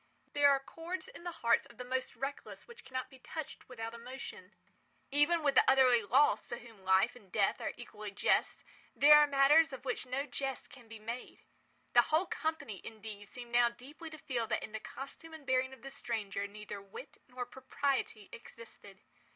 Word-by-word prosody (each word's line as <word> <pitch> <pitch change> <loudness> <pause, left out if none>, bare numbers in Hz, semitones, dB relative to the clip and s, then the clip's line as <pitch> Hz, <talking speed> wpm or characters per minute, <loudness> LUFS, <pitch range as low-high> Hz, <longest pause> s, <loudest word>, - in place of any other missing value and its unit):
There 290 -1 +6
are 275 -1 +4
chords 340 +8 -6
in 480 -7 -12
the 350 - -2
hearts 235 - +4
of 235 - -17
the 250 - -5
most 260 +1 -2
reckless 270 +3 -6
which 475 0 -13
cannot 255 +1 -5
be 265 - -15
touched 315 +1 -7
without 225 -2 -6
emotion. 250 +3 -9 0.6
Even 310 +4 +3
with 285 -2 +3
the - - +7
utterly 255 -3 +6
lost, 260 +8 +3
to 240 - -3
whom 225 -4 -14
life 190 +5 +4
and 205 -7 -17
death 200 0 +1
are - - -2
equally 215 -3 -8
jests, 200 +1 +1 0.3
there 300 +1 +9
are 295 - +6
matters 285 +3 +6
of 265 0 -8
which 250 0 -2
no 265 +3 -1
jest 270 -2 -4
can 245 -3 -14
be 225 0 -9
made. 230 +3 -7 0.5
The 240 - +9
whole 320 +4 +3
company, 315 - -3
indeed, 215 -2 -9
seemed 240 -1 -10
now 240 0 +5
deeply 280 +8 -11
to 315 - -10
feel 240 -6 -2
that - - -1
in - - -7
the 220 - -4
costume 320 +7 -9
and 305 -3 -12
bearing 260 0 +2
of 265 -3 -13
the 270 - -7
stranger 205 -6 -3
neither 205 0 -8
wit 200 +8 -11
nor 250 0 -5
propriety 265 -5 -2
existed. 220 -4 -12
255 Hz, 190 wpm, -33 LUFS, 225-280 Hz, 0.6 s, there